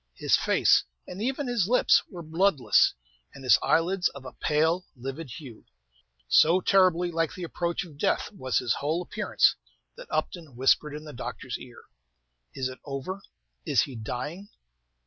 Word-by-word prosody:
His -, -, +2 dB
face, -, -, +3 dB, 0.2 s
and 185 Hz, +3 st, -8 dB
even 265 Hz, +4 st, -1 dB
his 240 Hz, -7 st, 0 dB
lips, 250 Hz, +3 st, +4 dB
were 175 Hz, -3 st, -8 dB
bloodless, 160 Hz, -2 st, +3 dB, 0.4 s
and 135 Hz, -, -11 dB
his 130 Hz, -, +5 dB
eyelids 180 Hz, +3 st, +2 dB
of 140 Hz, -1 st, -12 dB
a 125 Hz, -, -8 dB
pale, 160 Hz, +4 st, 0 dB
livid 135 Hz, +4 st, -7 dB
hue. 125 Hz, -2 st, -10 dB, 0.6 s
So 165 Hz, -, +5 dB
terribly 180 Hz, -2 st, +3 dB
like 165 Hz, -1 st, -1 dB
the 185 Hz, -, -7 dB
approach 170 Hz, +1 st, -2 dB
of 150 Hz, -4 st, -15 dB
death -, -, 0 dB
was 130 Hz, -, -2 dB
his 120 Hz, -2 st, +1 dB
whole 160 Hz, +5 st, -2 dB
appearance -, -, +2 dB, 0.4 s
that -, -, -10 dB
Upton 160 Hz, -8 st, -3 dB
whispered 140 Hz, +4 st, +2 dB
in 150 Hz, -, -8 dB
the 150 Hz, -1 st, -10 dB
doctor's 125 Hz, 0 st, -6 dB
ear, 120 Hz, -1 st, -13 dB, 0.7 s
"Is 130 Hz, -1 st, -1 dB
it 130 Hz, 0 st, -9 dB
over? 145 Hz, +8 st, -5 dB, 0.4 s
Is -, -, +2 dB
he 135 Hz, -, -4 dB
dying?" 145 Hz, -, -6 dB
160 Hz, 160 wpm, -27 LUFS, 130-180 Hz, 0.7 s, his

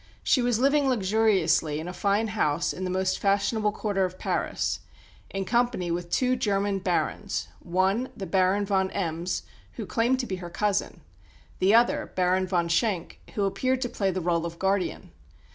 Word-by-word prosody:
She 260 Hz, -, +3 dB
was 240 Hz, -2 st, +2 dB
living 280 Hz, +2 st, +3 dB
luxuriously 190 Hz, -, +2 dB
in 160 Hz, -, -6 dB
a 180 Hz, -, -5 dB
fine 205 Hz, +3 st, +1 dB
house 155 Hz, -9 st, 0 dB
in 185 Hz, -, -4 dB
the -, -, -2 dB
most 185 Hz, +1 st, 0 dB
fashionable 205 Hz, +2 st, +1 dB
quarter 205 Hz, -2 st, -1 dB
of 185 Hz, 0 st, -3 dB
Paris, -, -, -1 dB, 0.5 s
in 195 Hz, 0 st, -3 dB
company 235 Hz, -6 st, +1 dB
with 175 Hz, 0 st, -3 dB
two 255 Hz, +5 st, +2 dB
German 200 Hz, -4 st, 0 dB
"Barons" 180 Hz, -2 st, -1 dB
one, 190 Hz, +8 st, 0 dB
the 195 Hz, -, -4 dB
Baron 190 Hz, +2 st, +2 dB
von 190 Hz, -1 st, +1 dB
Embs, 170 Hz, -1 st, -2 dB, 0.3 s
who -, -, -6 dB
claimed 245 Hz, +2 st, +1 dB
to -, -, -4 dB
be 190 Hz, -5 st, -4 dB
her 175 Hz, -1 st, -7 dB
cousin; 200 Hz, +3 st, -1 dB, 0.6 s
the 195 Hz, +4 st, +4 dB
other, 240 Hz, +1 st, +3 dB
Baron 185 Hz, +1 st, +2 dB
von 175 Hz, -2 st, +1 dB
Schenk, 175 Hz, 0 st, 0 dB, 0.2 s
who 205 Hz, -, 0 dB
appeared 255 Hz, +7 st, 0 dB
to 245 Hz, -, -1 dB
play 195 Hz, -4 st, -1 dB
the 185 Hz, -1 st, -2 dB
rôle 170 Hz, -1 st, +1 dB
of 170 Hz, 0 st, -5 dB
guardian. 190 Hz, 0 st, -1 dB
195 Hz, 175 wpm, -26 LUFS, 180-220 Hz, 0.6 s, the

